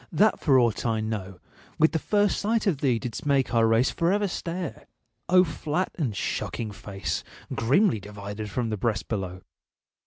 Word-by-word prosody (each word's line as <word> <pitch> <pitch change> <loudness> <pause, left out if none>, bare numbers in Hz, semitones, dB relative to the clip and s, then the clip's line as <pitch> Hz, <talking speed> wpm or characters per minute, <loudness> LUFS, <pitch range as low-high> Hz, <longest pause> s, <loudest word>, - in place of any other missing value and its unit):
that 210 +7 +3
for 135 -3 +4
aught 120 -4 +2
I 115 -2 +1
know, 100 -4 -4 0.4
With 160 - +4
the 160 - 0
first 205 +4 +2
sight 220 +2 +1
of 175 -9 +1
thee 130 -5 +2
didst 120 +5 -5
make 140 -4 +1
our 115 -1 +4
race 115 +3 +3
For 170 +1 +1
ever 205 +1 +2
stare! 175 -1 -5 0.4
O 180 0 +7
flat 160 +1 -2
and 125 - -2
shocking 110 -2 -3
face, 100 -1 -4 0.3
Grimly 140 - +3
divided 100 +1 -7
from 115 +2 -2
the 110 - -1
breast 110 +1 -1
below! 95 -4 -4
125 Hz, 175 wpm, -26 LUFS, 110-170 Hz, 0.4 s, O